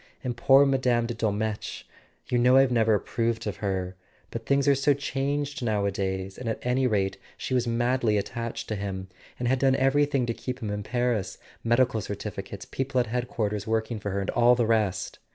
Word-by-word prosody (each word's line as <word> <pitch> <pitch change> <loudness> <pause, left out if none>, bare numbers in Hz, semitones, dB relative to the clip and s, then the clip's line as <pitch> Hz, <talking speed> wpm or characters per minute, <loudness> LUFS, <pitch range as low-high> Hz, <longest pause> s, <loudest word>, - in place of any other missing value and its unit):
And 125 -2 -2
poor 135 +4 +6
Mme. 125 -3 +2
de 120 - -3
Dol¬ 110 -2 0
metsch—you 110 +3 -4
know 125 +2 +5
I've 135 -1 +5
never 110 -2 +3
approved 115 +2 -1
of 100 -4 -3
her; 95 -2 -2 0.4
but 115 -1 -6
things 140 0 +2
are 140 - +7
so 140 +1 +3
changed 140 +1 -2
nowadays, 100 -3 -1
and 125 -2 -3
at 110 - -1
any 125 +1 +2
rate 100 -4 0 0.2
she - - -4
was 125 -1 +1
madly 120 -1 +1
attached 115 +3 -4
to 110 - -1
him, 95 -2 -5 0.3
and 125 - -2
had 130 +1 +2
done 135 0 +4
everything 135 0 +2
to 115 - -1
keep 125 +2 -5
him 110 -4 -4
in 105 0 -3
Paris: 115 -3 -1 0.3
medical 120 -1 +2
certificates, 100 -1 -6
people 135 0 -1
at 120 - +2
Headquarters 110 -3 -2
working 110 0 -1
for 100 - -4
her, 100 0 -1
and 95 - -2
all 120 +1 +5
the 120 -1 +1
rest. 105 -5 0
115 Hz, 190 wpm, -27 LUFS, 105-130 Hz, 0.4 s, are